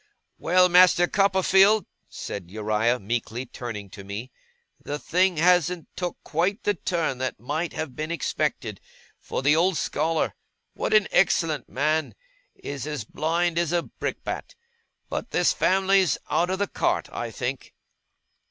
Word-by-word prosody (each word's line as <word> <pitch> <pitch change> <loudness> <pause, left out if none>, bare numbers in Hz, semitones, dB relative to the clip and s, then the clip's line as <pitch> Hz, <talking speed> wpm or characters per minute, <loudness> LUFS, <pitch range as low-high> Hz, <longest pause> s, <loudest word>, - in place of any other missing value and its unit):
'Well, 180 +2 +4
Master 180 0 +6
Copperfield!' 195 +2 +4 0.2
said 90 -4 -7
Uriah, 110 +4 +1
meekly 115 +3 -3
turning 115 -5 -7
to 100 - -10
me. 105 +6 -7 0.5
'The 145 - -3
thing 180 +3 +1
hasn't 175 0 +2
took 180 -2 -3
quite 185 +8 -1
the 205 - +2
turn 165 -6 -2
that 130 -4 -3
might 150 +8 -3
have 145 -6 -5
been 155 +1 -4
expected, 170 - -2 0.4
for - - -4
the 145 +2 +5
old 175 +1 +2
Scholar 160 +1 0 0.4
what - - 0
an 210 -2 +5
excellent 165 -5 +2
man! 155 +3 0 0.4
is 140 0 -6
as 150 -6 -3
blind 170 +7 0
as 170 -2 0
a 175 -1 +1
brickbat; - - -5 0.5
but - - -4
this - - +2
family's 190 -4 +3
out 175 - +2
of 190 - 0
the 200 - +1
cart, - - 0
I - - -4
think! - - -5
165 Hz, 145 wpm, -25 LUFS, 130-180 Hz, 0.5 s, Master